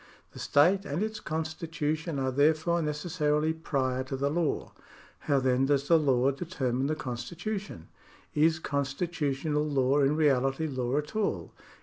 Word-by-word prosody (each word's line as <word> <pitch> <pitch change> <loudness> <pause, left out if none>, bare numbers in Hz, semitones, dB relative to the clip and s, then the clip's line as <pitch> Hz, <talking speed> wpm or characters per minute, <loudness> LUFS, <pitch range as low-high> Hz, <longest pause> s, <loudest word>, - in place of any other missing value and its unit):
The - - -11
state 180 +7 +3
and 155 +3 -2
its 220 0 -3
constitution 160 -1 -3
are 130 -1 0
therefore 155 +5 +2
necessarily 150 0 0
prior 130 -5 -1
to 135 0 -4
the 140 +1 0
law. 165 -1 -1 0.6
How 140 -1 +4
then 130 0 +2
does 140 0 +1
the 165 -1 +6
law 135 -3 +3
determine 135 -5 -2
the 155 - 0
constitu 155 - -4
tion? 85 - -11 0.5
Is 160 +2 +3
constitutional 145 0 -1
law 140 -2 +2
in 140 +1 +3
reality 135 -1 +2
law 130 -2 -1
at 150 +6 -3
all 215 -2 -1
150 Hz, 145 wpm, -29 LUFS, 135-160 Hz, 0.6 s, the